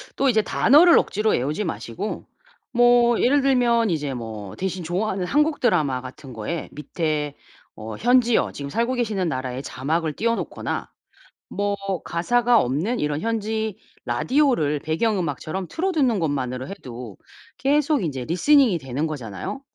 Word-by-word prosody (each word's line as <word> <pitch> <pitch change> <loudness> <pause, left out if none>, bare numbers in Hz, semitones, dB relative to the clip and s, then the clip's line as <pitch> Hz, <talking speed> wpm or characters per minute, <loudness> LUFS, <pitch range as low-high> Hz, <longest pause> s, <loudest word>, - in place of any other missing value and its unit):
또 275 -1 +2
이제 220 -3 +3
단어를 310 +11 +5
억지로 215 +2 +1
외우지 150 +11 0
마시고 165 - -5 0.5
뭐 240 -1 +4
예를 280 +3 +4
들면 240 -4 +3
이제 145 -5 -2
뭐 110 -5 -7
대신 185 -1 -3
좋아하는 185 +2 -1
한국 300 - +1
드라마 150 - +1
같은 130 0 -10
거에 115 +10 -4
밑에 150 -1 -3 0.4
어 110 0 -7
현지어 240 -1 +3
지금 140 -1 -6
살고 235 - 0
계시는 210 -8 -1
나라의 130 0 -4
자막을 155 +4 -2
띄워 230 +6 0
놓거나 - - -4 0.6
뭐 205 0 -1 0.3
가사가 240 +7 +2
없는 160 - -1
이런 150 +1 -1
현지 220 -2 -2 0.3
라디오를 150 - +1
배경음악처럼 175 - -2
틀어두는 305 - +1
것만으로 130 -4 -2
해도 125 - -9 0.4
계속 290 - +2
인제 135 -6 -3
리스닝이 235 - +4
되는 135 +4 -3
거잖아요. 125 - -6
180 Hz, 320 characters per minute, -23 LUFS, -, 0.6 s, 단어를